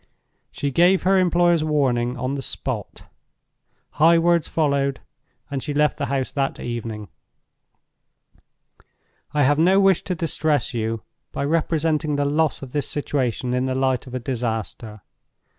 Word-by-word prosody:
She 140 0 -3
gave 180 +6 +4
her 190 +1 +4
employers 175 -2 +3
warning 130 -5 0
on 130 +2 -2
the 140 - -3
spot. - - -5 0.9
High 165 +2 +5
words 170 -1 +2
followed, 140 -3 0 0.5
and 135 -2 -2
she 145 +1 -4
left 150 0 +2
the 140 - -1
house 135 -2 -1
that 135 -1 -2
evening. 115 -3 -5 2.2
"I 150 -1 +2
have 145 +3 +3
no 185 +4 +5
wish 195 -3 +4
to 180 - -2
distress 155 -5 0
you 115 -1 -2 0.3
by 140 - -3
representing 155 -1 0
the 145 0 0
loss 150 0 +1
of 130 - -9
this 145 0 -2
situation 130 -4 -2
in 125 +1 0
the 130 - -1
light 130 -1 0
of 125 - -7
a - - -1
disaster. 115 -3 -4
140 Hz, 145 wpm, -22 LUFS, 125-160 Hz, 2.2 s, High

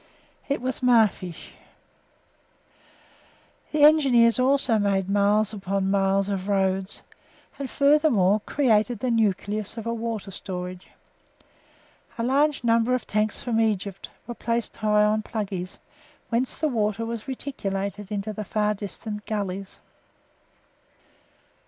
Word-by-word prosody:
It 280 -3 -1
was 255 0 -2
Mafeesh. 220 -8 +1 2.2
The 300 -1 +2
Engineers 260 -6 +5
also 255 -3 +3
made 195 -2 +1
miles 205 +2 +2
upon 195 -1 -1
miles 195 0 +2
of 195 -1 -3
roads 190 -1 0 0.6
and, 275 -2 -4
furthermore, 280 - +3
created 240 -4 +2
the 245 +4 -1
nucleus 215 -1 0
of 225 - -5
a 230 - -1
water 225 -3 -4
storage. 180 -1 -6 1.3
A 230 - -2
number 250 -3 +2
of 255 - -2
large - - -19
tanks 215 0 -1
from 225 -2 +1
Egypt 200 -3 -2 0.2
were 240 - -5
placed 235 -1 -3
high 210 -1 +3
up 210 - +3
on 215 0 0
"Pluggey's," 195 -5 -5 0.5
whence 245 +2 -1
the 310 - 0
water 225 -4 -1
was 230 -1 -5
reticulated 205 -7 -4
into 210 +1 -3
the 215 - -5
far 210 +1 0
distant 210 +1 -7
gullies. 195 -2 -4
215 Hz, 120 wpm, -25 LUFS, 195-235 Hz, 2.2 s, Engineers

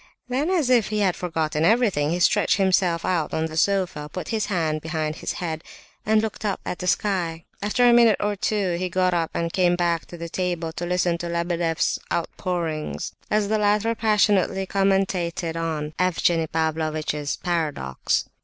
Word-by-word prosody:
Then, 275 +6 0
as 325 -9 +2
if 235 -4 +4
he 210 0 -1
had 185 -3 +2
forgotten 160 -3 -1
everything, 200 -7 +3
he 175 +2 -1
stretched 205 +4 +3
himself 185 -3 +2
out 175 -4 0
on 160 - 0
the 160 -1 -6
sofa, 175 -4 0
put 185 - -6
his 220 -2 -1
hands 160 -6 0
behind 155 -1 -3
his - - -3
head, 160 -2 -4 0.4
and 215 0 +4
looked 220 0 -4
up 205 -2 -1
at 180 - -4
the 180 - -4
sky. 175 -5 0 0.2
After 225 +5 +3
a 240 - +6
minute 235 -3 +6
or 205 0 0
two 195 -3 0
he 185 0 -2
got 185 0 +1
up 165 -2 0
and 170 0 -1
came 180 -2 +3
back 170 -2 0
to 175 - -9
the 170 0 -5
table 175 -2 -2
to 175 +2 -5
listen 180 -1 +1
to 170 - -4
Lebedeff's 170 -1 0
outpourings, 170 -2 -3 0.2
as 210 -1 +1
the 215 +1 +1
latter 210 +2 +2
passionately 205 -4 +2
commentated 190 -4 0
on 160 -2 -3
Evgenie 170 -2 +2
Pavlovitch's 155 -2 -1
paradox. 155 - -1
175 Hz, 175 wpm, -24 LUFS, 165-200 Hz, 0.4 s, a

